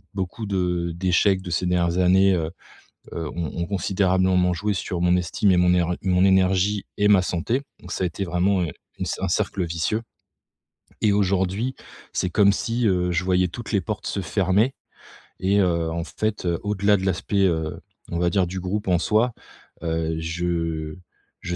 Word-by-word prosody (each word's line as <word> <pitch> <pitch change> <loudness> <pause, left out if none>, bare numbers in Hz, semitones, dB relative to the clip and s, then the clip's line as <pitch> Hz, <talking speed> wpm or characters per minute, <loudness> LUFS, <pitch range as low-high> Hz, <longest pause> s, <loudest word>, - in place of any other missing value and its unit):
beaucoup 95 +3 -4
de 90 -3 -1
d'échecs 95 +2 +2
de 90 - -6
ces 85 +2 0
dernières 90 0 +1
années, 95 +2 +5
heu, 80 -2 -1 0.6
heu, 80 -2 -4
ont 85 -3 -4
ont - - -2
considérablement 95 -2 +2
joué 105 +4 -1
sur 90 -2 -3
mon 90 +1 +3
estime 90 +3 0
et 90 - +4
mon 90 0 +4
er 90 0 +1
mon 90 0 +3
énergie 95 +1 +2
et 105 - +3
ma 100 -3 +6
santé. 115 +11 -1 0.2
Donc 90 - -10
ça - - -2
a - - +2
été 85 +4 -4
vraiment, 90 +2 +1
heu, 85 - -1 0.3
une - - -2
c - - -2
un - - 0
cercle 90 - 0
vicieux 85 +6 -1 1.0
et 105 - +4
aujourd'hui 100 +5 0 0.4
c'est 90 - 0
comme 100 0 +5
si, 115 +1 0
heu, 90 -2 +1
je 85 +1 0
voyais 90 -1 +2
toutes 120 +6 -7
les 100 - +3
portes 105 +4 -5
se 100 - -2
fermer 95 +7 +1 0.7
et, 100 +2 +3
heu, 85 -3 +1
en 85 0 -2
fait, 110 0 -3
heu, 85 -1 +1
au-delà 105 0 +2
de 95 - -5
l'aspect, 95 +2 +1
heu, 80 -2 -2 0.3
on 85 - -2
va 85 0 +2
dire, 95 -3 +1
du 95 +2 -5
groupe 100 +2 -3
en 90 -2 +3
soi, 110 +6 +2 0.5
heu, 80 -1 -1
je 85 -1 -2 0.5
je 85 0 -3
90 Hz, 185 wpm, -23 LUFS, 85-100 Hz, 1.0 s, ma